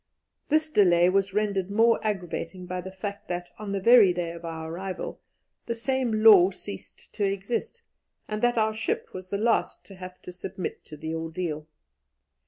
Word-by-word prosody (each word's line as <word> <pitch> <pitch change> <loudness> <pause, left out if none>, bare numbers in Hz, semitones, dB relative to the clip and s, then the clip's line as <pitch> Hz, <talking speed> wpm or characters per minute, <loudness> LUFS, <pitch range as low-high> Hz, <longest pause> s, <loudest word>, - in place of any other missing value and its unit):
This 310 +1 +2
delay 175 - +5
was 195 +1 +1
rendered 200 -3 0
more 225 +3 +4
aggravating 180 -3 -3
by 180 0 -4
the 190 +1 -8
fact 200 +2 -6
that, 175 0 -4
on 210 -2 -5
the 200 - -1
very 220 -2 +7
day 175 -1 -3
of 170 0 -10
our 160 -1 -5
arrival, 185 +1 -5 0.5
the 235 - -1
same 235 -2 0
law 195 -5 +9
ceased 200 +1 -10
to 205 - -2
exist, 200 - -2 0.4
and 215 0 -3
that 240 0 +2
our 220 0 +2
ship 220 - -2
was 185 0 -8
the 200 - -1
last 225 +2 0
to 195 - -12
have 185 0 -9
to - - -8
submit 180 0 -6
to 150 - -10
the 160 +2 -5
ordeal. 160 -1 -4
195 Hz, 180 wpm, -27 LUFS, 175-215 Hz, 0.5 s, law